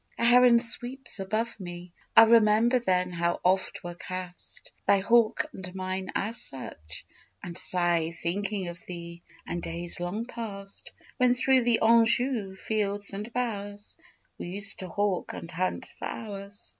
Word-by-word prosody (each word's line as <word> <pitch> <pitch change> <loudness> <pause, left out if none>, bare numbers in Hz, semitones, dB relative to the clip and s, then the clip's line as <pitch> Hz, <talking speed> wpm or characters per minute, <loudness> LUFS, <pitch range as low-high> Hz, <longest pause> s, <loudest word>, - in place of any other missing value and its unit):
A 235 - +1
heron 245 0 +7
sweeps 245 +1 +1
above 215 +4 -2
me: 175 -1 -8 0.3
I 225 - +12
Remember 225 +2 +5
then 180 -5 0
how 170 0 -1
oft 190 +1 +1
were 175 0 -5
cast 180 0 -6 0.2
Thy 200 - +6
hawk 230 +7 +3
and 185 -1 -8
mine 185 0 -3
at 220 +4 -1
such: 80 - -5 0.4
and 175 -1 -7
sigh 175 -3 +2
Thinking 190 +3 -3
of 175 +1 -10
thee 170 -1 -8 0.2
and 175 0 -4
days 170 +1 -2
long 185 +6 -3
past, 220 - -7 0.3
When 250 -1 +4
through 260 -1 +3
the 235 -2 +3
Anjou 230 -2 +3
fields 205 0 -1
and 210 +4 -6
bowers 205 -4 -4 0.4
We - - -5
used 200 +2 +4
to 185 - -6
hawk 200 0 -1
and 170 - -7
hunt 185 +1 -2
for - - -4
hours. 200 -2 -7
200 Hz, 150 wpm, -28 LUFS, 180-230 Hz, 0.4 s, I